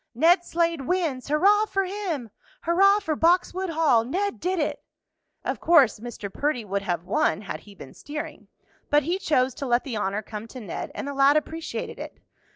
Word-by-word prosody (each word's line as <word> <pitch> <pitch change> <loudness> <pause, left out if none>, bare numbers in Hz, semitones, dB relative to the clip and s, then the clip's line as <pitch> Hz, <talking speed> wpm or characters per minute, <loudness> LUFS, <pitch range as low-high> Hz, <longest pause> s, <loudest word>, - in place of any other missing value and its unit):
"Ned 345 +7 +5
Slade 335 -3 0
wins!" 325 -9 -1
"Hurrah 400 +9 +4
for 390 -2 0
him!" 360 - -4 0.3
"Hurrah 390 +4 +5
for 320 -7 -2
Boxwood 360 +3 +2
Hall!" 310 -8 +3
"Ned 385 - -2
did 370 +1 -1
it!" 300 - -2 0.6
Of - - -2
course 290 -10 +5
Mr. 215 -4 -7
Perdy 285 -6 -1
would 200 0 -2
have 175 -4 -2
won 210 +3 +1
had 175 -6 -6
he 200 +4 -16
been 135 - -11
steering, 295 0 -7 0.4
but 295 0 +4
he 345 +6 -1
chose 260 -7 +1
to 275 - -5
let 240 0 +2
the 245 -6 -4
honor 205 +1 -2
come 210 +2 -7
to 255 - -9
Ned, 205 -8 -5
and - - -4
the 285 - -3
lad 275 +2 +5
appreciated 320 +2 -4
it. - - -8
295 Hz, 185 wpm, -25 LUFS, 230-345 Hz, 0.6 s, Ned